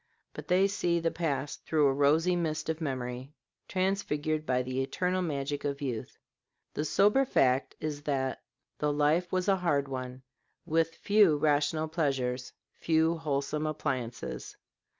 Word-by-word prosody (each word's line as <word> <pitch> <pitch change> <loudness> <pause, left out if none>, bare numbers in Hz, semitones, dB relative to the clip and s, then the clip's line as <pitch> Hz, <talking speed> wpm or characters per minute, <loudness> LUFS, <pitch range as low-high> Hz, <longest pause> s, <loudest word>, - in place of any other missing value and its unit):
But - - -9
they 185 +2 +4
see 175 -4 0
the 165 0 0
past 145 -4 -3
through 155 -2 +2
a 135 - +4
rosy 155 +6 +3
mist 160 -2 -2
of 160 +1 -2
memory, 130 0 -4 0.3
transfigured 155 -5 -1
by 125 0 +1
the 130 +1 -2
eternal 180 +7 -1
magic 145 -4 -2
of 140 -1 -2
youth. 125 -6 -4 0.6
The 150 - -2
sober 210 - +4
fact 135 - +2
is 150 -2 -4
that 135 -3 -1 0.4
the 150 0 +1
life 150 +4 +2
was 185 0 0
a 195 -1 +4
hard 145 -6 +1
one, 130 -1 -6 0.4
with 165 0 +1
few 205 -7 +4
rational 150 +1 +1
pleasures, 130 -6 -1 0.3
few 160 0 +2
wholesome 150 0 -1
appliances. 130 -6 -4
150 Hz, 145 wpm, -30 LUFS, 135-165 Hz, 0.6 s, they